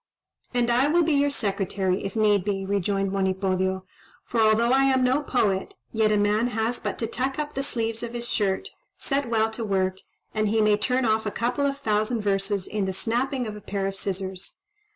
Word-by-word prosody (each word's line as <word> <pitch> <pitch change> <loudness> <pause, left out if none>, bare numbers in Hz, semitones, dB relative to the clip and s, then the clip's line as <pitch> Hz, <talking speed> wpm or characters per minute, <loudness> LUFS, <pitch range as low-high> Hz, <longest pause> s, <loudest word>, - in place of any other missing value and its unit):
"And 240 -1 +1
I 250 +4 +4
will 340 +3 +3
be 315 -1 +2
your 285 0 +3
secretary, 195 -6 -1
if 195 +1 -4
need 210 -3 +3
be," 195 -1 -2
rejoined 195 0 0
Monipodio, 190 -1 0 0.4
"for 230 - 0
although 220 +2 +4
I 270 +1 +5
am 260 -1 +3
no 260 +3 +3
poet, 205 -9 0 0.2
yet 220 -1 +3
a 210 - +3
man 210 +3 +2
has 225 0 -1
but - - -3
to 230 - -1
tuck 260 +4 -2
up 300 -1 -3
the 275 - -2
sleeves 230 -4 -2
of 235 0 -5
his 240 0 -3
shirt, 205 - 0 0.3
set 275 -3 -1
well 220 -1 +2
to 225 +1 -5
work, 190 -2 0 0.3
and 215 -1 +1
he 220 +2 +1
may 215 -1 +4
turn 250 +4 +1
off 220 0 +1
a - - +2
couple 250 +6 0
of 275 0 -2
thousand 215 -2 0
verses 195 -1 0
in 210 -2 -2
the 190 - -2
snapping 245 +6 -1
of 215 -1 -5
a 210 - -9
pair 195 0 -3
of 195 0 -2
scissors. 190 - -5
220 Hz, 210 wpm, -25 LUFS, 195-245 Hz, 0.4 s, I